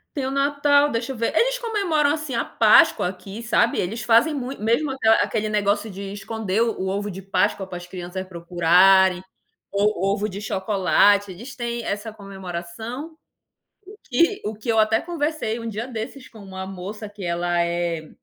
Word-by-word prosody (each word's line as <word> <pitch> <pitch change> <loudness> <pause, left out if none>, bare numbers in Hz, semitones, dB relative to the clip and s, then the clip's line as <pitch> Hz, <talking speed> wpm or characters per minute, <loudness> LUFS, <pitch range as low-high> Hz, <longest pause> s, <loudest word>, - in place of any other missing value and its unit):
Tem 275 - -2
o 265 - -2
Natal, 285 +1 +3
deixa 230 +3 -2
eu - - -6
ver. 230 +6 -1
Eles - - +2
comemoram, 390 -11 +1
assim, 305 -3 -3
a 230 - 0
Páscoa 320 - +4
aqui, 195 +4 -9
sabe? 235 0 +2
Eles 215 +6 -3
fazem 235 +7 +4
mui 265 -1 -4
mesmo 235 +8 0 0.3
aquele 215 -1 -1
negócio 210 0 0
de 195 +1 -7
esconder 205 0 -2
o 225 -5 -1
ovo 205 +2 -2
de 190 +1 -8
Páscoa 195 0 0
para 180 -2 -6
as 175 - -9
crianças 180 +1 -6
procurarem, 180 +1 +4 0.5
o 200 -2 +1
o 195 - +2
ovo 210 +1 -2
de 195 0 -6
chocolate, 200 0 +2
eles 235 +9 -10
têm 235 -1 -3
essa 210 +1 -4
comemoração, 200 - -7 0.9
que 335 - +1
o 210 - -2
que 215 +2 -12
eu 225 -1 +2
até 220 +1 +4
conversei 310 -8 -2
um 230 -1 -5
dia 220 +3 -4
desses 255 +2 -7
com 220 - -15
uma 190 -2 -7
moça 195 +3 -7
que 205 -1 -11
ela 175 0 0
é 170 -2 -2
210 Hz, 175 wpm, -23 LUFS, 190-245 Hz, 0.9 s, Páscoa